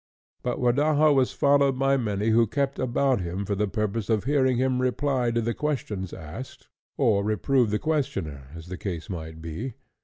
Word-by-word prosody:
But 125 - -2
Rodaja 145 +4 +3
was 130 -2 +3
followed 140 -2 +3
by 135 +1 +3
many 105 -4 0
who 115 +1 +4
kept 140 +4 -1
about 130 -2 +1
him 90 +3 -3
for 100 - -1
the 105 +1 0
purpose 105 +1 -2
of 110 -3 +2
hearing 130 -2 +2
him 130 0 +1
reply 130 -1 +1
to 115 0 0
the 115 +1 -1
questions 110 - -3
asked, 80 +12 -9 0.3
or 100 -3 +3
reprove 110 +4 +2
the 105 - +1
questioner, 80 - -2
as 80 -1 -9
the 90 0 -6
case 90 0 -5
might 80 -2 -7
be. 105 +10 -5
120 Hz, 180 wpm, -26 LUFS, 100-135 Hz, 0.3 s, who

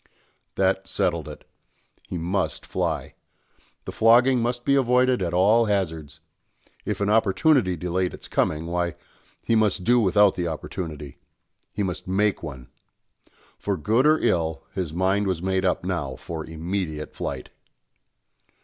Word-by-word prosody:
That 95 0 +1
settled 85 -5 -1
it. - - -12 0.6
He 90 - -4
must 90 +3 -2
fly. - - -2 0.7
The - - -5
flogging 120 +3 +5
must 120 +1 -2
be 140 - +3
avoided 125 -2 +3
at 85 -2 -1
all 105 +6 +4
hazards. 80 -8 -2 0.7
If - - -3
an 100 - +1
opportunity 110 - +3
delayed 90 +2 -1
its - - -12
coming, 80 +1 0
why, 85 0 -2 0.5
he 115 - +2
must 105 -4 +2
do 120 +6 +4
without 105 -1 +4
the 90 -1 -2
opportunity 75 -2 -6 0.5
he 105 - -2
must 90 -2 -4
make 100 +2 +1
one. 70 -6 -8 0.9
For - - -2
good 115 - +2
or 155 +1 +5
ill, 80 - 0
his 90 -5 -3
mind 95 +4 +1
was 90 -2 -2
made 95 0 0
up 90 - +1
now 75 -8 -3
for 80 +2 -7
immediate 80 -1 -4
flight. - - -5
95 Hz, 140 wpm, -24 LUFS, 85-105 Hz, 0.9 s, flogging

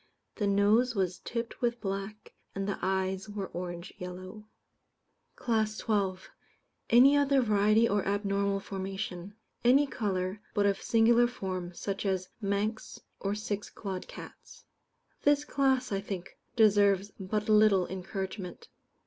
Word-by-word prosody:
The 205 - 0
nose 210 +5 +3
was 185 -2 -1
tipped 235 0 -5
with 240 -1 0
black, 195 +1 -5 0.2
and 195 0 -2
the 200 - -2
eyes 190 +1 -1
were 205 -2 -5
orange 175 -1 -6
yellow. 185 +4 -8 0.9
CLASS 220 -3 0
XII. 195 -4 0 0.6
Any 260 +5 +7
other 280 -1 +3
Variety 215 +1 +4
or 205 -2 +1
Abnormal 200 0 0
Formation. 195 0 -5 0.3
Any 265 +4 +5
colour, 195 -6 -2
but 205 -1 +3
of 200 -1 +1
singular 235 +1 +4
form, 185 -6 -5
such 195 +2 -3
as 185 -1 -1
Manx 205 +2 -2 0.2
or 200 +1 -1
six 210 -1 -4
clawed 190 -3 -6
cats. - - -12 0.6
This 290 0 +3
class, 265 -3 +1
I 195 -1 -1
think, 195 -3 -6 0.2
deserves 205 -3 +4
but 210 +2 -2
little 210 -3 +5
encouragement. 190 0 -6
200 Hz, 130 wpm, -30 LUFS, 190-220 Hz, 0.9 s, Any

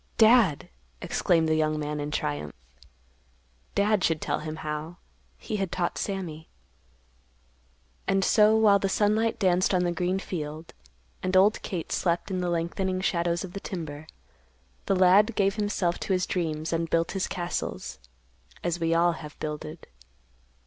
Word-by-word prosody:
"Dad!" 220 - +5 0.3
exclaimed 165 -2 +1
the 160 - +2
young 155 -1 +1
man 150 0 -3
in 145 0 -3
triumph. 75 - -3 1.2
Dad 205 -1 +2
should 160 -1 +2
tell - - -2
him 155 0 -5
how. 155 +3 -4 0.4
He 215 - -4
had 195 -3 -2
taught 175 -1 -2
Sammy. 170 -6 -4 1.6
And 195 0 +2
so 215 0 +5
while 210 -2 +5
the 195 - 0
sunlight 215 +3 +1
danced 185 0 +2
on 180 - +2
the 175 - +1
green 180 +2 0
field, 160 -4 -6 0.5
and 185 0 +1
old 205 +3 +4
Kate 180 -5 -5
slept 170 +1 0
in 185 -1 -1
the 180 - -1
lengthening 180 +3 -1
shadows 170 -1 0
of 185 -2 -8
the 200 - -5
timber, 155 -6 -6 0.8
the 195 - +3
lad 195 +5 +5
gave 195 -1 +2
himself 205 -4 0
to 195 - -1
his 185 0 +1
dreams 160 -3 -2
and 165 0 -1
built 165 0 +1
his 195 -2 -1
castles—as 65 - -6
we 165 0 +1
all 170 +1 +4
have 155 -2 -9
builded. 155 +1 -6
175 Hz, 150 wpm, -27 LUFS, 155-195 Hz, 1.6 s, Dad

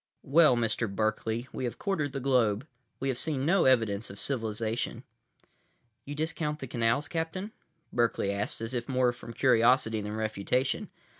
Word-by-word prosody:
"Well, 150 -1 +5
Mr. 115 -1 0
Berkeley, 110 +3 -1
we 130 - -3
have 120 - -4
quartered 155 -8 -1
the 135 - -3
globe. 125 -3 +2 0.3
We 135 - -1
have 125 - -1
seen 140 -4 -1
no 175 +4 +4
evidence 115 -5 +2
of 100 - -10
civilization." 115 -1 -2 1.0
"You 145 - -5
discount 155 -1 -2
the 135 - -6
canals, 120 +3 0
Captain?" 170 +5 -3 0.4
Berkeley 115 -4 +1
asked, 100 +2 -3
as 115 +2 -4
if 120 0 -3
more 125 -2 +3
from 120 - -10
curiosity 115 -2 +3
than 105 +1 -4
refutation. 110 +4 -1
120 Hz, 155 wpm, -29 LUFS, 110-140 Hz, 1.0 s, Well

